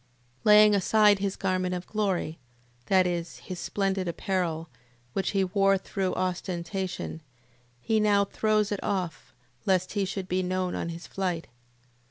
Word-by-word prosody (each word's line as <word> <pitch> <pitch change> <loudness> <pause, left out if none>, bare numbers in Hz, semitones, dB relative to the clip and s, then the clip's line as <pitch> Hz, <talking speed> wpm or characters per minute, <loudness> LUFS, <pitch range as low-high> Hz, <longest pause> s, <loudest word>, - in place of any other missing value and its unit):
Laying 210 0 +7
aside 205 +1 +4
his 195 -1 -1
garment 185 -1 -1
of 180 0 -5
glory... 190 -6 -1 0.5
That 185 -1 +4
is, 175 -1 -3
his 185 -2 -7
splendid 195 -2 -1
apparel, 170 -2 -1 0.5
which 195 - 0
he 195 -1 +1
wore 195 +1 +3
through 190 -1 -2
ostentation; 180 -1 -3 0.6
he 220 - +1
now 205 -1 +4
throws 215 0 +1
it 205 - -1
off, 185 -5 -3 0.4
lest 185 -1 +2
he 200 -2 +1
should 190 -1 -4
be 185 +1 0
known 185 0 -1
on 170 - -3
his 170 +1 -7
flight. 180 -4 -3
190 Hz, 145 wpm, -27 LUFS, 180-200 Hz, 0.6 s, Laying